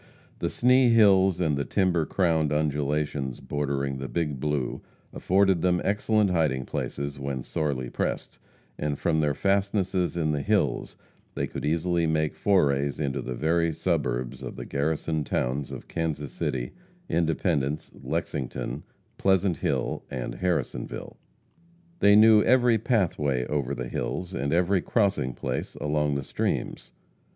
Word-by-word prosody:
The - - -1
Sni 125 0 +4
hills 95 -5 +5
and 80 -5 +1
the 70 - -1
timber 90 -2 +1
crowned 80 -5 +1
undulations 75 -2 -1
bordering 70 -2 -2
the 65 - -4
Big 75 +2 -2
Blue, 75 -3 -2 0.3
afforded 95 -2 +2
them 90 -1 +2
excellent 105 0 +2
hiding 75 -7 +1
places 70 0 -4
when 70 -2 -3
sorely 70 -5 -2
pressed, - - -3 0.4
and 75 -1 -1
from 80 -2 +1
their 75 -2 +1
fastnesses 95 -2 0
in 80 -2 +1
the 75 -1 -1
hills - - 0 0.4
they - - -1
could - - -7
easily 85 +2 +1
make 80 -1 0
forays 70 -8 +1
into 70 -4 -1
the 65 - -5
very 85 +4 +1
suburbs - - -2
of - - -6
the - - -7
garrisoned 75 0 -1
towns 65 +3 -1
of - - -8
Kansas 80 -4 -3
City, - - -3 0.4
Independence, 80 -3 0
Lexington, 65 0 -4 0.4
Pleasant 95 -2 +2
Hill - - -1
and 60 -1 -4
Harrisonville. 90 -2 -3 0.8
They 100 0 +6
knew 110 0 +7
every 120 -2 +4
pathway 80 - +1
over 70 -1 -2
the 65 0 -4
hills, 90 +7 -4
and 70 +1 -2
every 90 +2 +2
crossing 100 - +1
place - - -4
along 75 -1 0
the 70 - -2
streams. - - -3
80 Hz, 140 wpm, -26 LUFS, 70-95 Hz, 0.8 s, knew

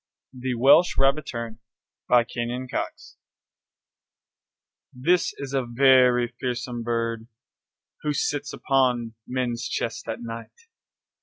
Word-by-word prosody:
THE 130 0 -3
WELSH 140 +9 +5
RABBITTERN 125 -5 0 0.5
BY 120 -1 +6
KENYON 120 +2 -4
COX - - -5 1.7
This 170 +8 +1
is 140 -1 -6
a 135 -1 +1
very 125 -1 +4
fearsome 125 -1 -3
bird 115 -1 -2 0.7
Who 150 - -1
sits 145 0 -1
upon 125 -4 +1
men's 120 -2 -2
chests 115 - -3
at 115 +1 -4
night. 115 - -9
125 Hz, 100 wpm, -25 LUFS, 120-135 Hz, 1.7 s, BY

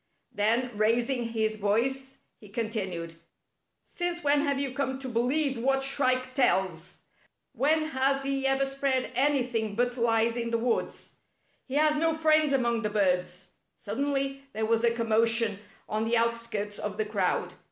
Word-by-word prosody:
Then, 230 +4 0
raising 235 +4 +1
his 220 -1 -1
voice, 265 +6 -1 0.2
he 210 - -14
continued: 195 -7 -3 0.4
" - - -51
Since 350 -1 -4
when 290 0 +3
have 280 -2 0
you 275 -2 -2
come 265 -1 -2
to 265 0 -6
be 235 -2 -1
lieve 270 +1 0
what 270 +2 +1
Shrike 255 -2 +1
tells! 190 - 0 0.5
When 310 +3 +2
has 275 -1 +1
he 275 0 0
ever 270 0 +2
spread 270 -1 -1
anything 250 -6 0
but 245 +2 0
lies 230 0 +2
in 235 -1 -2
the 230 - +1
woods? 235 +1 -2 0.5
He 265 - -5
has 305 +1 +3
no 325 +1 +2
friends 310 -2 +3
among 235 -4 +1
the 210 - -1
birds 180 -3 -1
— - - -48
" - - -51
Suddenly 275 +4 -2
there 220 0 -1
was 225 +1 +1
a 235 - +5
commotion 230 -2 +2 0.3
on 215 +1 -1
the 230 +1 +2
out 235 0 +1
skirts 210 -3 -4
of 210 -1 -4
the 215 - 0
crowd. 200 -4 -1
240 Hz, 170 wpm, -28 LUFS, 220-270 Hz, 0.5 s, a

